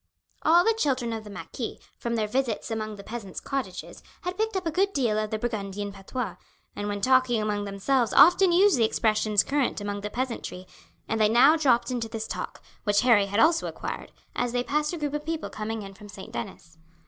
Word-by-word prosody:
All 340 Hz, +2 st, +5 dB
the 450 Hz, -, +4 dB
children 260 Hz, -, 0 dB
of 220 Hz, -1 st, -5 dB
the 210 Hz, -, -11 dB
marquis, 200 Hz, -, -6 dB, 0.2 s
from 235 Hz, 0 st, -2 dB
their 220 Hz, -2 st, +1 dB
visits 235 Hz, 0 st, -2 dB
among 215 Hz, -1 st, -3 dB
the 200 Hz, -, -11 dB
peasants' 215 Hz, -5 st, -6 dB
cottages, 255 Hz, -10 st, -5 dB, 0.2 s
had 360 Hz, +1 st, -4 dB
picked 440 Hz, +1 st, -1 dB
up 375 Hz, -1 st, -2 dB
a 325 Hz, -, 0 dB
good 390 Hz, +4 st, +1 dB
deal 235 Hz, -7 st, +1 dB
of 215 Hz, 0 st, -2 dB
the 220 Hz, -, -2 dB
Burgundian 205 Hz, -3 st, -3 dB
patois, 200 Hz, +6 st, -5 dB, 0.4 s
and 205 Hz, -, -3 dB
when 205 Hz, -1 st, -3 dB
talking 255 Hz, -1 st, +3 dB
among 210 Hz, -1 st, -1 dB
themselves 220 Hz, +5 st, 0 dB
often 355 Hz, +3 st, +7 dB
used 365 Hz, -4 st, +5 dB
the -, -, +4 dB
expressions 215 Hz, -2 st, +2 dB
current 280 Hz, -5 st, 0 dB
among 205 Hz, 0 st, -4 dB
the 210 Hz, -, -4 dB
peasantry, 230 Hz, -7 st, -4 dB, 0.4 s
and 225 Hz, 0 st, -1 dB
they 210 Hz, -, +5 dB
now 250 Hz, +7 st, +6 dB
dropped 255 Hz, -6 st, +2 dB
into 235 Hz, -3 st, -2 dB
this 220 Hz, 0 st, -4 dB
talk, -, -, -6 dB, 0.2 s
which 205 Hz, -1 st, +3 dB
Harry 225 Hz, -5 st, +5 dB
had 205 Hz, +2 st, -1 dB
also 325 Hz, +5 st, +4 dB
acquired, -, -, -6 dB, 0.2 s
as 245 Hz, -1 st, -1 dB
they 245 Hz, 0 st, +1 dB
passed 300 Hz, +3 st, 0 dB
a 345 Hz, -, -4 dB
group 295 Hz, -2 st, -3 dB
of 295 Hz, 0 st, -2 dB
people 320 Hz, 0 st, -4 dB
coming 215 Hz, 0 st, -4 dB
in 195 Hz, 0 st, -9 dB
from 205 Hz, +1 st, -13 dB
St. 190 Hz, -1 st, -10 dB
Denis. 160 Hz, +7 st, -7 dB
230 Hz, 210 wpm, -26 LUFS, 210-280 Hz, 0.4 s, often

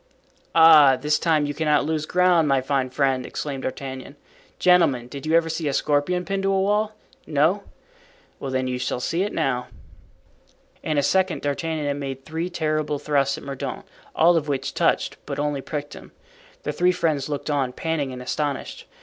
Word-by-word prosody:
"Ah, 155 Hz, -5 st, +8 dB
this 150 Hz, +1 st, +1 dB
time 155 Hz, -3 st, +2 dB
you 145 Hz, -, -3 dB
cannot 150 Hz, -1 st, +1 dB
lose 155 Hz, 0 st, -2 dB
ground, 180 Hz, -3 st, +3 dB
my 135 Hz, -1 st, +3 dB
fine 130 Hz, 0 st, -1 dB
friend!" 130 Hz, -1 st, 0 dB
exclaimed 140 Hz, -3 st, -5 dB
D'Artagnan. 130 Hz, +1 st, -6 dB, 0.4 s
"Gentlemen, 165 Hz, -9 st, +3 dB
did 140 Hz, +4 st, -8 dB
you 160 Hz, -, +3 dB
ever 165 Hz, -1 st, +3 dB
see 160 Hz, -1 st, -3 dB
a 140 Hz, -, 0 dB
scorpion 150 Hz, +6 st, 0 dB
pinned 195 Hz, +3 st, -2 dB
to 195 Hz, 0 st, +1 dB
a 195 Hz, -, +2 dB
wall? 210 Hz, +2 st, +1 dB, 0.3 s
No. 160 Hz, +7 st, +1 dB, 0.7 s
Well, 135 Hz, -, -5 dB
then, 130 Hz, 0 st, -1 dB
you 125 Hz, 0 st, -2 dB
shall 125 Hz, 0 st, -2 dB
see 165 Hz, +7 st, -1 dB
it 205 Hz, +2 st, -1 dB
now." 125 Hz, -5 st, -1 dB, 1.1 s
In 155 Hz, -2 st, -2 dB
a 145 Hz, -, +3 dB
second 190 Hz, +2 st, +1 dB
D'Artagnan 155 Hz, +2 st, -2 dB
had 145 Hz, 0 st, -1 dB
made 135 Hz, -1 st, -6 dB
three 165 Hz, +3 st, -3 dB
terrible 155 Hz, -3 st, -1 dB
thrusts 140 Hz, -2 st, 0 dB
at -, -, -10 dB
Mordaunt, 140 Hz, -1 st, -5 dB, 0.3 s
all 170 Hz, +1 st, +5 dB
of 150 Hz, -2 st, -2 dB
which 140 Hz, -2 st, -2 dB
touched, -, -, +1 dB
but -, -, -4 dB
only 145 Hz, -1 st, -1 dB
pricked 145 Hz, +1 st, -5 dB
him. -, -, -13 dB, 0.5 s
The -, -, -2 dB
three 180 Hz, +1 st, +3 dB
friends 155 Hz, -6 st, -1 dB
looked 145 Hz, +1 st, -3 dB
on, 135 Hz, -3 st, 0 dB
panting 150 Hz, -1 st, -2 dB
and 125 Hz, 0 st, -7 dB
astonished. 145 Hz, +1 st, -3 dB
150 Hz, 185 wpm, -23 LUFS, 135-165 Hz, 1.1 s, Ah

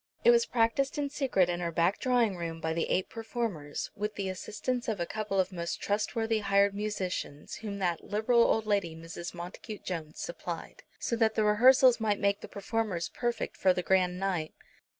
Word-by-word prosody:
It 480 Hz, -, +8 dB
was 470 Hz, 0 st, +4 dB
practised 260 Hz, +5 st, +1 dB
in 285 Hz, -1 st, -1 dB
secret 260 Hz, -11 st, +2 dB
in 175 Hz, 0 st, -1 dB
her 170 Hz, -1 st, -2 dB
back 170 Hz, +4 st, +2 dB
drawing 245 Hz, -6 st, +2 dB
room 165 Hz, -2 st, -4 dB
by 160 Hz, 0 st, -1 dB
the 165 Hz, -, -1 dB
eight 185 Hz, -, +1 dB
performers, 220 Hz, -10 st, -4 dB
with 210 Hz, +1 st, -3 dB
the 195 Hz, -2 st, -2 dB
assistance 225 Hz, +6 st, -3 dB
of 220 Hz, -4 st, -1 dB
a 170 Hz, -, 0 dB
couple 210 Hz, 0 st, -2 dB
of 190 Hz, 0 st, +1 dB
most 170 Hz, -2 st, -3 dB
trustworthy 220 Hz, +2 st, 0 dB
hired 200 Hz, 0 st, +3 dB
musicians, 195 Hz, -8 st, -4 dB
whom 210 Hz, -2 st, -5 dB
that 175 Hz, -4 st, -1 dB
liberal 220 Hz, +3 st, +2 dB
old 220 Hz, -1 st, +3 dB
lady, 200 Hz, -6 st, 0 dB
Mrs. 165 Hz, +2 st, -7 dB
Montacute 180 Hz, +5 st, -8 dB
Jones, 160 Hz, -4 st, -5 dB
supplied, -, -, -6 dB, 0.2 s
so 235 Hz, -, -1 dB
that 220 Hz, -1 st, +2 dB
the 215 Hz, -, +2 dB
rehearsals 245 Hz, +4 st, +6 dB
might 210 Hz, -2 st, +1 dB
make 200 Hz, 0 st, +1 dB
the -, -, -7 dB
performers 200 Hz, -4 st, -2 dB
perfect 240 Hz, -2 st, -2 dB
for 185 Hz, -1 st, +3 dB
the 180 Hz, -, -1 dB
grand 180 Hz, -1 st, +2 dB
night. 180 Hz, -5 st, -2 dB
200 Hz, 190 wpm, -30 LUFS, 180-225 Hz, 0.2 s, It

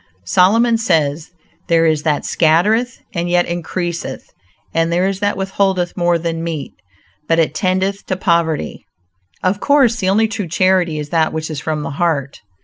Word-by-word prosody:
Solomon 225 Hz, -, +3 dB
says: 160 Hz, -6 st, 0 dB, 0.4 s
"There 165 Hz, -1 st, +3 dB
is 155 Hz, -2 st, +2 dB
that 150 Hz, -1 st, -1 dB
scattereth 210 Hz, +10 st, +2 dB
and 175 Hz, 0 st, -2 dB
yet 175 Hz, 0 st, +3 dB
increaseth; 175 Hz, 0 st, -4 dB, 0.4 s
and 165 Hz, 0 st, +1 dB
there 180 Hz, +2 st, +2 dB
is 195 Hz, -1 st, -2 dB
that 205 Hz, -1 st, 0 dB
withholdeth 190 Hz, -2 st, 0 dB
more 175 Hz, -1 st, +2 dB
than 165 Hz, 0 st, -3 dB
meet, 160 Hz, -4 st, -4 dB, 0.5 s
but 165 Hz, -, +2 dB
it 160 Hz, -3 st, +2 dB
tendeth 190 Hz, +3 st, -1 dB
to 185 Hz, -, -1 dB
poverty." 170 Hz, -, 0 dB, 0.6 s
Of 185 Hz, +2 st, +1 dB
course 270 Hz, -4 st, +3 dB
the 190 Hz, -4 st, 0 dB
only 220 Hz, +3 st, +3 dB
true 210 Hz, -3 st, -4 dB
charity 180 Hz, -1 st, +2 dB
is 150 Hz, -1 st, -5 dB
that 160 Hz, -1 st, +1 dB
which 160 Hz, 0 st, -4 dB
is 150 Hz, -, -4 dB
from 155 Hz, -2 st, -2 dB
the -, -, -4 dB
heart. 140 Hz, -6 st, -1 dB
175 Hz, 165 wpm, -17 LUFS, 160-195 Hz, 0.6 s, Solomon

